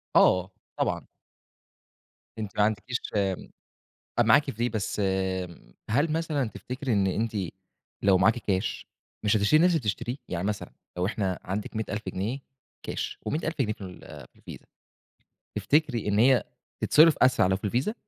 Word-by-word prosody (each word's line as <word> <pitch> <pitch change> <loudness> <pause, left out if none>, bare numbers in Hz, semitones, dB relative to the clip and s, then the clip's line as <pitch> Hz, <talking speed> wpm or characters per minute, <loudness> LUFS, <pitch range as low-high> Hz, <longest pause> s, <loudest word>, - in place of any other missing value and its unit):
آه، 90 +1 +5 0.3
طبعًا. - - -1 1.3
أنتِ 105 -3 -6
ما 105 - +5
عندكيش 110 +4 0 1.2
معاكِ 135 +5 +5
في 120 +3 -1
بس 105 -2 -3 0.9
هل 145 +8 +2
مثلًا 155 -6 0
تفتكري 125 +6 -4
إن 100 -2 +2
أنتِ 110 +3 -1 0.7
لو 95 -2 +5
معاكِ 110 +6 +4
كاش 100 -1 -2 0.4
مش 105 +1 +4
هتشتري 105 +10 +4
نفس 180 - +6
اللي 165 - +2
بتشتريه؟ 120 +2 -2
يعني 90 0 -3
مثلًا، 105 -1 -3 0.3
لو 90 - +1
إحنا 95 -2 -1
عندِك 100 +4 -4
100.000 110 -1 -2
جنيه 105 +9 -3 0.4
كاش - - -4
و100.000 155 +2 -2
جنيه 110 -4 0
في - - -18
ال 90 -1 -9 0.3
في - - -45
الفيزا، - - -11 0.9
تفتكري 145 -8 +1
إن 105 0 +2
هي 130 +2 +5 0.4
تتصرّف 155 +1 +6
أسرع 130 -7 +4
لو 95 0 +2
في 100 - -12
الفيزا 125 - 0
110 Hz, 145 wpm, -27 LUFS, 100-130 Hz, 1.3 s, نفس